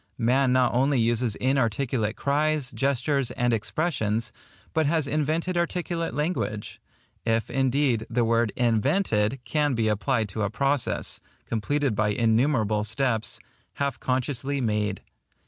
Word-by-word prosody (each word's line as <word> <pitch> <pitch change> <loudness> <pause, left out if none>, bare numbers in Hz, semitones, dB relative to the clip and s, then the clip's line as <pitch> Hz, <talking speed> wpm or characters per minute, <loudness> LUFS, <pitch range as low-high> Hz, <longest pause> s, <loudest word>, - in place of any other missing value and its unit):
Man 130 +3 +2
not 130 -1 +3
only 135 +2 +2
uses 115 -1 +1
inarticulate 125 -3 0
cries, 150 -1 0
gestures, 135 0 0
and 120 0 0
expressions, 115 -3 -1 0.4
but 160 -2 +2
has 155 -2 +1
invented 155 +5 0
articulate 170 -4 -2
language; 150 - -2 0.4
if, 115 -1 0
indeed, 130 -3 +1
the 120 0 +1
word 115 -1 +2
INVENTED 120 - +1
can 145 +1 +1
be 115 -1 +1
applied 110 +2 +1
to 110 +3 -4
a 100 - +1
process, 135 +3 -1 0.3
completed 135 +4 0
by 105 +1 +1
innumerable 110 0 +2
steps, 115 +1 -1 0.3
half 140 -1 -2
consciously 130 +2 -1
made. 105 -4 -1
125 Hz, 125 wpm, -26 LUFS, 110-140 Hz, 0.4 s, not